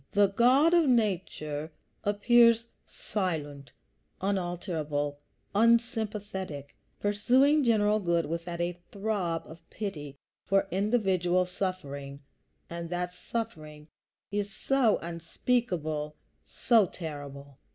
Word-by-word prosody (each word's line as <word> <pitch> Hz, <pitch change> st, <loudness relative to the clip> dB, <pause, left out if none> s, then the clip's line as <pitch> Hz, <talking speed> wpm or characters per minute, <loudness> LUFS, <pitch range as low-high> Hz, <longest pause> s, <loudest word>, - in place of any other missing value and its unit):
The 205 Hz, -1 st, +5 dB
God 255 Hz, -, +4 dB
of 340 Hz, -3 st, +5 dB
nature 170 Hz, -9 st, 0 dB, 0.3 s
appears 230 Hz, +3 st, +4 dB, 0.2 s
silent, 150 Hz, -8 st, -4 dB, 0.5 s
unalterable, 170 Hz, -6 st, -2 dB, 0.3 s
unsympathetic, 210 Hz, -, 0 dB, 0.2 s
pursuing 255 Hz, +9 st, +3 dB
general 215 Hz, -3 st, +3 dB
good 170 Hz, -4 st, +1 dB
without 170 Hz, +2 st, -4 dB
a 175 Hz, 0 st, -2 dB
throb 195 Hz, -5 st, -2 dB
of 160 Hz, +2 st, -12 dB
pity 150 Hz, -10 st, -6 dB, 0.3 s
for 195 Hz, 0 st, +2 dB
individual 185 Hz, -3 st, +2 dB
suffering; 145 Hz, -7 st, -5 dB, 0.5 s
and 170 Hz, 0 st, -6 dB
that 180 Hz, 0 st, -3 dB
suffering 155 Hz, -8 st, -6 dB, 0.4 s
is 205 Hz, 0 st, -2 dB
so 260 Hz, -1 st, +2 dB
unspeakable, 165 Hz, -3 st, -2 dB, 0.3 s
so 225 Hz, -5 st, +3 dB
terrible! 140 Hz, -4 st, -8 dB
185 Hz, 90 wpm, -29 LUFS, 160-215 Hz, 0.5 s, The